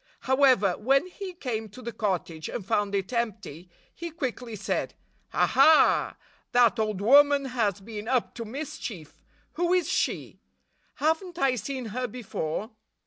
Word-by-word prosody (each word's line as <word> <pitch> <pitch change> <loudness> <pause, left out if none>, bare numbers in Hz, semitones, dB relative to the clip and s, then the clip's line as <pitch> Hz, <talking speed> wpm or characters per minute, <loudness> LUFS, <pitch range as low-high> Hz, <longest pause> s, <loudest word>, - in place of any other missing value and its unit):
However, 260 -8 +3
when 270 +7 +3
he 370 +1 -8
came 225 -9 -4
to 255 +6 -12
the 235 - -4
cottage 175 -7 -3
and 205 - -5
found 205 0 0
it 195 +5 -2
empty, 215 -8 -3 0.2
he 340 0 -6
quickly 255 -7 -5
said, 200 - -2 0.4
"Aha! 315 0 +4 0.4
That 240 -1 +4
old 215 -3 -1
woman 285 +4 +6
has 225 -7 -1
been 210 +1 -7
up 255 -2 0
to 230 - -6
mischief! 225 - -7 0.3
Who 350 +1 0
is 360 -4 +2
she? 380 - -2 0.6
Have 320 +5 +1
n't 355 -2 -11
I 270 -6 +2
seen 250 +1 -4
her 250 +1 -2
before? 210 -4 -4
240 Hz, 145 wpm, -27 LUFS, 210-280 Hz, 0.6 s, woman